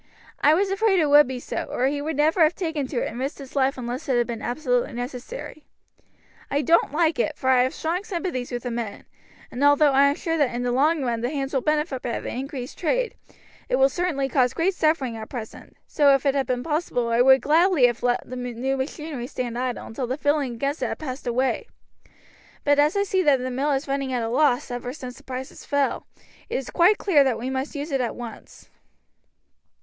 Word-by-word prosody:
I 300 +2 +5
was 385 +2 +1
afraid 390 -1 +2
it 300 -3 +2
would 295 -1 +7
be 260 -1 -4
so, - - -4
or 255 - 0
he 285 +2 0
would 310 0 -3
never 315 +4 +3
have 315 +1 +5
taken 320 -7 -2
to 255 -3 -2
it - - -2
and 235 - -6
risked 270 +3 -3
his 275 -1 -11
life 270 0 +2
unless 250 +2 -5
it 255 - +3
had 240 - +2
been 230 -2 -5
absolutely 245 -1 -1
necessary. 255 - -7 0.9
I 285 +1 0
don't 335 -1 +3
like 315 0 +1
it, 305 -1 0
for 260 -1 +1
I 255 -1 +5
have 255 +2 +1
strong 340 +4 -2
sympathies 345 - -4
with 240 -1 -4
the 245 - -3
men, 230 -3 -5 0.5
and 250 - -3
although 290 0 +5
I 275 +1 +5
am 280 - +1
sure 325 0 -2
that 260 -5 +1
in 245 - -2
the 245 - 0
long 295 +4 +2
run 235 -2 -1
the 240 - -1
hands 275 -1 -3
will 265 - +1
benefit 300 -1 0
by 235 - -3
the - - -6
increased 260 0 -6
trade, - - 0 0.6
it - - +2
certainly 320 -7 -1
cause 255 -1 +1
great 365 +4 +1
suffering 310 -8 +1
at 220 0 -8
present, 230 -4 -8
so 285 -3 +4
if 275 - -3
it 275 - +3
had 275 -1 0
been 250 -1 -1
possible 300 -7 -1
I 230 +1 +3
would 265 +1 +7
gladly 325 -2 +4
have 240 -1 +1
let 245 0 0
the 255 - -7
new 250 +2 -2
machinery 270 -1 -5
stand 245 -2 -4
idle 250 0 -3
until 245 +3 -4
the 260 +3 -2
feeling 290 -4 0
against 280 +6 -2
it - - +1
had - - -4
passed 265 -4 -6
away; 260 - 0 1.0
but 290 0 +3
as 295 +4 +3
I 400 - +3
see 385 -2 +1
that 290 -6 +4
the 255 0 -4
mill 270 +4 -1
has 275 +1 0
been 275 - -5
running 275 -2 -2
at 245 -2 0
a 225 - -2
loss 250 -1 +2
ever 245 +1 -4
since 255 -4 -9
prices 260 0 -7
fell, 285 -1 -1 0.4
it - - -3
is 260 -1 -3
quite 365 +4 +4
clear 315 -8 +4
that 260 -4 0
we 250 +3 -4
must 265 +3 -3
use 290 +2 -4
it 270 -2 +1
at 240 - -2
once." 240 -2 -10
270 Hz, 230 wpm, -24 LUFS, 250-305 Hz, 1.0 s, would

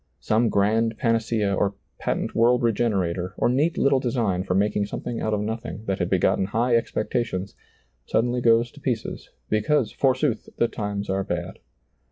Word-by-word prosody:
Some 115 +2 +2
grand 110 +3 +1
panacea 115 -4 +1
or 100 +1 0 0.2
patent - - -2
world 120 +2 +3
regenerator, 95 -6 0
or - - +2
neat 145 +7 +1
little 140 -1 +3
design 115 -8 0
for 90 -1 -1
making 100 +1 +1
something 120 +3 -5
out 110 - -1
of 105 -1 0
nothing 110 0 -5
that 95 -2 -1
had - - 0
begotten - - +2
high 115 +5 +1
expectations, 110 -4 -1 0.5
suddenly 120 +2 +1
goes 115 0 +3
to 145 - -15
pieces, 120 -5 -3 0.2
because 110 +4 +1
forsooth 130 -3 0
the 120 - +3
times 100 -2 -4
are 95 0 0
bad. 90 0 -4
110 Hz, 160 wpm, -24 LUFS, 100-120 Hz, 0.5 s, world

